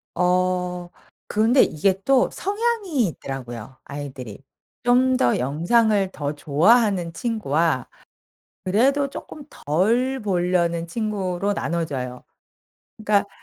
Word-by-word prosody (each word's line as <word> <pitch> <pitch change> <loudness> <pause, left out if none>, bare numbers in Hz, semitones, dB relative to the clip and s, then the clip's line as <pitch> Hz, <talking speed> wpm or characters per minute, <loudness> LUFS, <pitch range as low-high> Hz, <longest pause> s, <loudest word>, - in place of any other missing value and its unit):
어 180 0 0 0.4
근데 225 +5 +3
이게 190 +5 +1
또 270 -2 +4
성향이 405 - -1
있더라고요 130 -5 -7
아이들이. 135 -5 -8 0.4
좀 255 +1 +3
더 120 - +2
영상을 195 - +2
더 145 0 -3
좋아하는 175 +5 +2
친구와 165 - 0 0.8
그래도 270 +9 +2
쪼끔 295 +1 -9
덜 230 - 0
보려는 175 -4 0
친구로 200 -1 -2
나눠져요. 135 -9 -3 0.7
그러니까 205 -2 +1
185 Hz, 230 characters per minute, -23 LUFS, 155-230 Hz, 0.8 s, 또